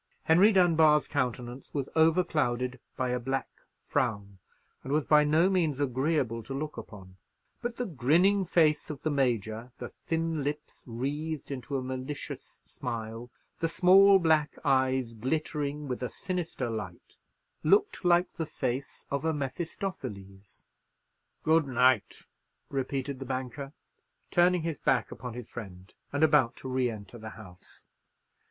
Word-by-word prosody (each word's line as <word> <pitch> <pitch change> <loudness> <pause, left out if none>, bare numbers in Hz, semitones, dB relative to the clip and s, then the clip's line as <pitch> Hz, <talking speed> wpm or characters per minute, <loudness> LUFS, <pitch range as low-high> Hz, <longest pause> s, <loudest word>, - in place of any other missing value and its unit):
Henry 180 +7 +6
Dunbar's 160 -6 +4
countenance 125 -2 -3
was 140 -2 -1
overclouded 150 -7 +2 0.2
by 130 -1 0
a 125 0 0
black 135 +2 -2 0.4
frown, 100 -5 -1 0.4
and 135 - -5
was 150 0 +2
by 150 -1 +6
no 155 +4 +4
means 165 -7 +1
agreeable 130 -3 0
to 135 +5 -6
look 150 +2 -4
upon; 100 -5 -11 0.4
but 240 0 -3
the 245 - -2
grinning 175 - +3
face 160 -4 +2
of 150 -3 -7
the 155 - 0
Major, 120 -4 -1
the 120 - -6 0.2
thin 165 -2 -1
lips 150 +1 -5
wreathed 145 +6 -4
into 135 +1 -3
a 130 - -3
malicious 130 +2 -6
smile, 115 0 -6 0.3
the 165 - +1
small 195 +3 +7
black 160 -4 +2
eyes 130 -3 +2
glittering 145 +4 -2
with 125 -1 -4
a 125 - -2
sinister 175 -8 -3
light, 105 -7 -7 0.4
looked 195 +6 +3
like 175 0 +3
the 160 -2 -4
face 130 -3 -4
of 140 +1 -1
a 160 - +2
Mephistopheles. 130 - -6 0.8
"Good 160 -1 +3
night," 125 -3 +2 0.5
repeated 135 0 -3
the 135 - -6
banker, 130 +1 -4 0.6
turning 175 -1 +4
his 165 -2 -3
back 135 -4 +1
upon 125 -2 -7
his 120 -2 -7
friend, 95 -4 -10 0.2
and 145 +2 0
about 150 -6 +4
to - - -9
re 130 -1 +1
enter 105 0 -9
the 110 0 -7
house. 90 -5 -15
135 Hz, 140 wpm, -29 LUFS, 120-160 Hz, 0.8 s, small